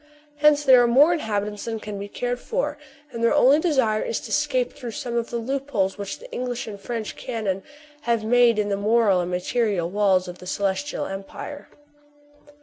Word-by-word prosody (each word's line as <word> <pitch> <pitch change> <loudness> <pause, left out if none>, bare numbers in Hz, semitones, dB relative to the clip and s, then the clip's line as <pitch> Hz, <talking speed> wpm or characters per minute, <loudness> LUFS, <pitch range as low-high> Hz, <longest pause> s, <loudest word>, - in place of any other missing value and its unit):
Hence 300 0 +4
there 260 -3 +7
are 240 - +4
more 285 +8 +6
inhabitants 210 -8 -3
than 225 -1 -3
can 210 -2 -6
be 200 - -5
cared 245 +4 -3
for; 485 - -2 0.4
and 230 -2 -5
their 235 - +4
only 275 +4 +6
desire 260 -10 +2
is - - -2
to - - -9
escape - - 0
through 245 - -7
some 240 -1 -4
of 235 -1 -1
the 235 - -3
loopholes 240 -5 -1
which 200 -1 -4
the - - -14
English 245 -1 -3
and 205 -2 -8
French 230 0 -4
cannon 215 -6 -3 0.5
have 230 -2 +2
made 240 0 +4
in 210 -1 0
the 200 - 0
moral 210 -2 +3
and 175 - -3
material 180 -1 -1
walls 195 -2 +2
of 180 0 -8
the 180 - -11
Celestial 200 +10 -2
Empire. 195 +9 -7
230 Hz, 190 wpm, -24 LUFS, 200-255 Hz, 0.5 s, there